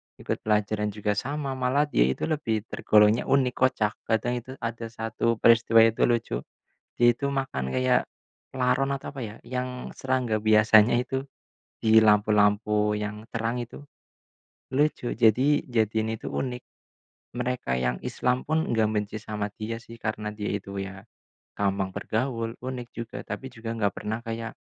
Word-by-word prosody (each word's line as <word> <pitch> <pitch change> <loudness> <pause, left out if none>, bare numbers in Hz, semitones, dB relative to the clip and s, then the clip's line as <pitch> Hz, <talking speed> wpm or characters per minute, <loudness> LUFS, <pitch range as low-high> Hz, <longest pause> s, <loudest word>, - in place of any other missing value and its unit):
ikut - - -4
pelajaran 105 0 +1
juga 105 -1 -1
sama, 135 +6 -2
malah 130 +3 +2
dia - - +4
itu 65 - -2
lebih 115 -9 -1
tergolongnya 105 +2 +4
unik, 130 -2 +3
kocak. 115 -5 +1
Kadang 120 +2 0
itu, 130 +2 -10
ada 115 0 -3
satu 115 +1 -1
peristiwa 115 0 +5
itu, 115 +1 +3
lucu. 115 - 0 0.6
Dia 120 - +6
itu 140 +3 -2
makan 65 - -2
kayak 130 -1 +1 0.4
laron 130 +1 +1
atau, 140 -1 -4
apa 135 - -4
ya, 105 -1 -7
yang 125 0 -4
serangga 130 -4 0
biasanya 110 +1 +5
itu, 130 +2 -2 0.6
di 110 0 +5
lampu-lampu 105 0 +3
yang 105 0 -5
terang 115 +1 -1
itu. 120 - -11 0.9
Lucu 145 -3 +1
jadi 125 +6 +4
jadiin 110 -2 +1
itu - - -13
unik. 125 -2 -3 0.7
Mereka 125 - -2
yang 60 0 0
Islam 125 0 0
pun 160 +1 0
nggak 110 -1 +2
benci 105 0 -2
sama 105 -1 -3
dia 110 +1 -4
sih, 115 0 -13
karena 105 -1 -3
dia 105 -1 -3
itu 100 -1 -4
ya 95 +1 -8 0.5
gampang 95 -1 -1
bergaul, 115 -1 -2
unik 125 -1 -6
juga, 115 0 -6
tapi 130 - -5
juga 115 0 -7
gak 100 -3 +1
pernah 110 +1 -3
kayak 115 0 -4
115 Hz, 150 wpm, -26 LUFS, 105-125 Hz, 0.9 s, Dia